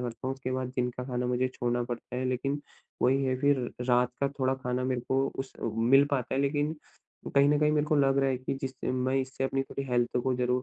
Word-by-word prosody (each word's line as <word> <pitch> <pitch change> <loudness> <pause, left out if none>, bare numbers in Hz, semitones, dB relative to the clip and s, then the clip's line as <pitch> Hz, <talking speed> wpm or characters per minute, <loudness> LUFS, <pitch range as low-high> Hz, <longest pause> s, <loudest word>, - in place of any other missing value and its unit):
करता 120 +1 -5
हूँ, 130 - -1
उसके 130 -1 -5
बाद 130 -1 -2
दिन 125 -1 +1
का 125 - -4
खाना 125 -1 -2
मुझे 125 +1 +1
छोड़ना 120 -1 -1
पड़ता 120 0 -5
है। 130 - -1
लेकिन 135 +3 -1 0.4
वही 135 +2 +3
है 130 -1 +1
फिर 145 -1 +4 0.3
रात 125 0 +4
का 140 - +2
थोड़ा 130 0 +2
खाना 125 -1 -2
मेरे 130 -1 0
को 135 +1 +2
उस 135 0 -4
अ, - - -7
मिल 125 +5 +5
पाता 130 -3 -1
है। 135 - +1
लेकिन 145 +2 0 0.6
कहीं 140 0 +6
न 150 0 +3
कहीं 150 0 +4
मेरे 150 0 +2
को 155 - +2
लग 135 -1 +3
रहा 135 - +3
है 130 - 0
कि 130 +1 -3
जिस 130 -1 -3
मैं 130 +1 0
इससे 130 0 -4
अपनी 135 0 0
पूरी 140 0 -5
हेल्थ 120 0 +1
को 130 - +2
ज़रूर 125 0 +1
130 Hz, 250 wpm, -29 LUFS, 125-135 Hz, 0.6 s, कहीं